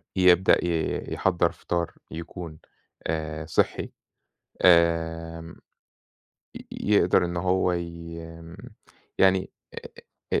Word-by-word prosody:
يبدأ 90 -1 +5
ي 85 -2 -1
يحضّر 85 -3 +1
فطار 85 -1 -3 0.2
يكون 85 -1 -8 0.5
آآ 80 -1 -3
صحّي، 75 - 0 0.7
آمم، 80 -1 +2 1.0
ي - - -8 0.3
يقدر - - +4
إن 85 0 -3
هو 90 +1 +1
ي 85 -1 -5
آمم، 85 +1 -11 0.6
يعني 95 -1 +3 0.8
آآ، - - +3
85 Hz, 90 wpm, -26 LUFS, 80-90 Hz, 1.0 s, يبدأ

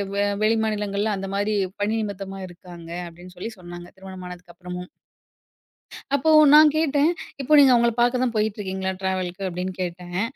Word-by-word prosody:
வெ 200 - +1 0.2
வெளி 225 +1 +3
மாநிலங்கள்ல, 210 0 -1
அந்தமாரி 200 +2 -2 0.3
பணி 215 +2 0
நிமித்தமா 195 -2 -6
இருக்காங்க. 175 -1 -12 0.2
அப்படின்னு 175 +2 -13
சொல்லி 225 +6 -5
சொன்னாங்க. 175 0 -10
திருமணம் 190 -1 -10
ஆனதுக்கு 180 -1 -11
அப்புறமும். 180 0 -8 1.3
அப்போ, 300 +3 +1 0.2
நா 300 - +10 0.2
கேட்டேன். 300 0 +2 0.3
இப்போ 275 +3 0
நீங்க 270 -2 +7
அவங்கள 235 0 +3
பாக்க 245 +1 +2
தான் 245 -2 -1
போயிட்டுருக்கீங்களா? 190 -3 -2
ட்ராவலுக்கு, 185 0 -2
அப்படின்னு 180 +1 -4
கேட்டேன். 180 +1 -4
190 Hz, 145 wpm, -23 LUFS, 180-220 Hz, 1.3 s, நா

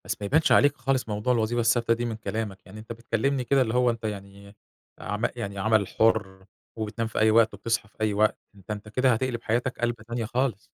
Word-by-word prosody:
بس 105 +3 -4
ما - - -2
يبانش 150 +9 +2
عليك 145 - +5
خالص 130 -2 -1
موضوع 105 +4 0
الوظيفة 115 0 0
الثابتة 115 0 +3
دي 120 +1 -2
من 115 -2 -3
كلامك، 110 -2 -4
يعني 105 +3 -11
أنت 110 +2 -10
بتكلّمني 120 +3 -1
كده 135 +2 +3
اللي 115 -3 0
هو 125 0 +3
أنت 115 -1 -3
يعني 100 -1 -7 0.4
عما 105 +3 -2
يعني 100 -5 -5
عمل 110 -1 +2
حُر، 95 -4 +1 0.3
وبتنام 110 +1 -3
في 110 - -3
أي 110 0 +5
وقت، 110 -1 +4
وبتصحى 115 +2 -2
في - - -30
أي 110 -1 +1
وقت، 105 +1 +2 0.2
ده 100 -2 -18
أنت 105 +1 -11
كده 130 +3 +3
هتقلب 120 0 -2
حياتك 120 +3 -1
قلبَة 120 -2 -1
تانية 120 -1 -3
خالص. 120 -2 -1
110 Hz, 220 wpm, -26 LUFS, 105-120 Hz, 0.4 s, عليك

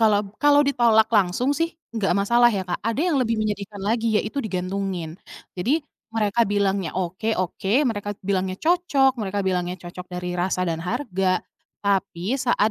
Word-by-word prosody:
kalau 210 -2 +4
b - - -11
kalau 290 0 +6
ditolak 230 -5 +4
langsung 210 +7 +2
sih 330 +1 0 0.2
nggak 200 -5 +1
masalah 235 +4 +5
ya, 195 - -1
Kak, 175 - -3
ada 230 +5 -1
yang 335 -3 +2
lebih 230 -2 +1
menyedihkan 205 -1 -3
lagi, 220 +1 +1
yaitu 250 +7 -3
digantungin. 185 -4 -3 0.4
Jadi 265 - +1 0.3
mereka 220 +1 +2
bilangnya 200 -4 +1
"oke, 190 +5 -1
oke," 185 +2 -2
mereka 205 -3 -2
bilangnya 190 -1 0
cocok, 320 -6 +3
mereka 205 -1 -2
bilangnya 180 -1 -1
cocok 180 +1 -8
dari 180 0 -4
rasa 180 0 0
dan 165 -1 -2
harga, 190 -3 0 0.4
tapi 195 +2 0
saat 220 -4 +2
205 Hz, 160 wpm, -23 LUFS, 185-230 Hz, 0.4 s, kalau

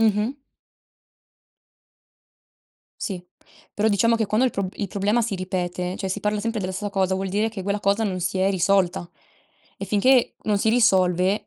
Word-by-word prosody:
Mh-mh. 215 +1 +2 2.7
Sì, 180 -3 -4 0.5
però 210 - 0
diciamo 230 +2 +3
che 225 -1 0
quando 215 +5 +2
il 255 - +2
pro 195 -3 -2
il 200 - -4
problema 205 +5 +1
si 210 -3 -2
ripete, 180 -1 -3
cioè 195 - -4
si 190 - -2
parla 210 +1 -1
sempre 230 +1 -2
della 185 -2 -3
stessa 205 +2 -4
cosa, 190 -1 +1
vuol 190 +1 -2
dire 210 +4 0
che 215 -4 -7
quella 200 +2 -1
cosa 200 +2 +1
non 195 -4 -1
si 180 +2 -2
è 190 +1 +2
risolta. 185 -2 +1 0.7
E - - -5
finché 230 +6 +3
non 210 -2 +1
si 220 - +1
risolve 190 -4 +3
200 Hz, 175 wpm, -23 LUFS, 185-215 Hz, 2.7 s, diciamo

